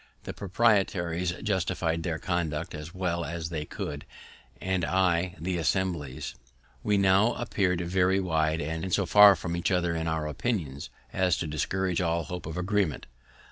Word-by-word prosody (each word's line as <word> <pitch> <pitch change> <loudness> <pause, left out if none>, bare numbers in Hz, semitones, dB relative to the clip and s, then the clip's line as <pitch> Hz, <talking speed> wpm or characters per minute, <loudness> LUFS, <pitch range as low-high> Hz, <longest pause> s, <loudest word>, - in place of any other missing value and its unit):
The - - -6
proprietaries 95 -4 +1
justify'd 90 -5 0
their 85 -2 -2
conduct 80 -3 -2
as 75 +1 -7
well 90 -2 -2
as 80 +1 -4
they 80 -3 -3
could, 75 -1 -5 0.6
and 95 -1 -1
I 90 +1 +1
the 90 +1 -2
Assembly's. 85 -6 -1 0.5
We 105 -1 +2
now 100 +4 +4
appeared 95 -7 0
very 95 +2 +2
wide, 80 -3 0
and 80 +4 -3
so 100 +2 +2
far 100 +2 +8
from 85 0 -4
each 85 - 0
other 90 -3 +1
in 80 0 -2
our 80 -1 -1
opinions 75 - -3 0.2
as 90 -2 +2
to - - -3
discourage 90 +4 -1
all 85 -1 0
hope 90 +2 -6
of 80 - -5
agreement. 95 -3 0
85 Hz, 155 wpm, -28 LUFS, 80-95 Hz, 0.6 s, far